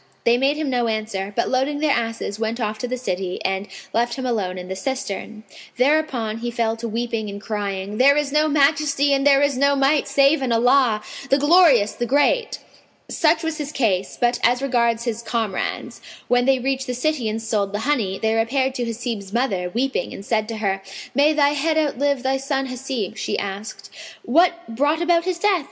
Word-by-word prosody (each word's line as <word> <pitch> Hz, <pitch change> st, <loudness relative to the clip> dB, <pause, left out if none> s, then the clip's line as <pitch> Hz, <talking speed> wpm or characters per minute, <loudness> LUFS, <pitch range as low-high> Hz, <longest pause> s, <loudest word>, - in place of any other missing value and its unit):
They 235 Hz, 0 st, +4 dB
made 270 Hz, +4 st, +1 dB
him 305 Hz, -3 st, -2 dB
no 245 Hz, -2 st, +1 dB
answer; 215 Hz, -3 st, -3 dB
but, 235 Hz, -, 0 dB
loading 270 Hz, +3 st, 0 dB
their 300 Hz, 0 st, +1 dB
asses, 225 Hz, -3 st, -3 dB
went 225 Hz, +1 st, -2 dB
off 215 Hz, -2 st, -2 dB
to 250 Hz, -, -3 dB
the 255 Hz, +1 st, -3 dB
city 185 Hz, -6 st, -3 dB
and 190 Hz, +1 st, -1 dB, 0.3 s
left 235 Hz, +1 st, 0 dB
him 260 Hz, -, -5 dB
alone 200 Hz, -7 st, -2 dB
in 180 Hz, 0 st, -7 dB
the 190 Hz, -, -4 dB
cistern. 220 Hz, -2 st, -5 dB, 0.3 s
Thereupon 250 Hz, -5 st, +1 dB
he 240 Hz, +1 st, -3 dB
fell 230 Hz, -1 st, -1 dB
to 230 Hz, +1 st, -5 dB
weeping 225 Hz, -1 st, -3 dB
and 200 Hz, 0 st, -7 dB
crying, 205 Hz, -1 st, -4 dB
"There 280 Hz, +3 st, +6 dB
is 295 Hz, -2 st, 0 dB
no 305 Hz, +1 st, +3 dB
Majesty 285 Hz, -1 st, +2 dB
and 275 Hz, +1 st, +2 dB
there 280 Hz, 0 st, +5 dB
is 285 Hz, -1 st, +1 dB
no 280 Hz, 0 st, +3 dB
Might 275 Hz, +2 st, +2 dB
save 275 Hz, +1 st, +3 dB
in 260 Hz, -2 st, -1 dB
Allah, 235 Hz, -2 st, +3 dB, 0.3 s
the 275 Hz, -, +4 dB
Glorious, 290 Hz, -, +5 dB
the 240 Hz, -, -4 dB
Great!" 290 Hz, -, +2 dB, 0.5 s
Such 320 Hz, 0 st, +2 dB
was 320 Hz, -1 st, -3 dB
his 295 Hz, -1 st, -4 dB
case; 205 Hz, -10 st, -1 dB
but 240 Hz, 0 st, +1 dB
as 245 Hz, +1 st, +3 dB
regards 235 Hz, -3 st, +1 dB
his 235 Hz, -2 st, -3 dB
comrades, 225 Hz, -4 st, -3 dB, 0.3 s
when 245 Hz, 0 st, +2 dB
they 270 Hz, 0 st, +4 dB
reached 265 Hz, +1 st, -2 dB
the 250 Hz, -, -2 dB
city 255 Hz, -3 st, -1 dB
and 215 Hz, +1 st, -3 dB
sold 215 Hz, -3 st, -1 dB
the 205 Hz, +1 st, -3 dB
honey, 225 Hz, -10 st, 0 dB
they 220 Hz, 0 st, +1 dB
repaired 260 Hz, +4 st, +1 dB
to 245 Hz, -2 st, -3 dB
Hasib's 230 Hz, -4 st, -5 dB
mother, 205 Hz, -7 st, -1 dB
weeping, 245 Hz, 0 st, -2 dB
and 200 Hz, -, -10 dB
said 215 Hz, -1 st, 0 dB
to 225 Hz, -1 st, -5 dB
her, 195 Hz, -2 st, -1 dB, 0.3 s
"May 285 Hz, +3 st, +4 dB
thy 290 Hz, -2 st, +3 dB
head 305 Hz, +2 st, 0 dB
outlive 285 Hz, -3 st, 0 dB
thy 265 Hz, 0 st, +1 dB
son 270 Hz, 0 st, -2 dB
Hasib!" 255 Hz, -5 st, -4 dB
She -, -, -2 dB
asked, 200 Hz, +2 st, -6 dB, 0.3 s
"What 340 Hz, +9 st, +4 dB, 0.2 s
brought 290 Hz, +5 st, +1 dB
about 340 Hz, 0 st, +2 dB
his 370 Hz, -2 st, -1 dB
death?" 390 Hz, 0 st, +2 dB
245 Hz, 200 wpm, -21 LUFS, 220-280 Hz, 0.5 s, There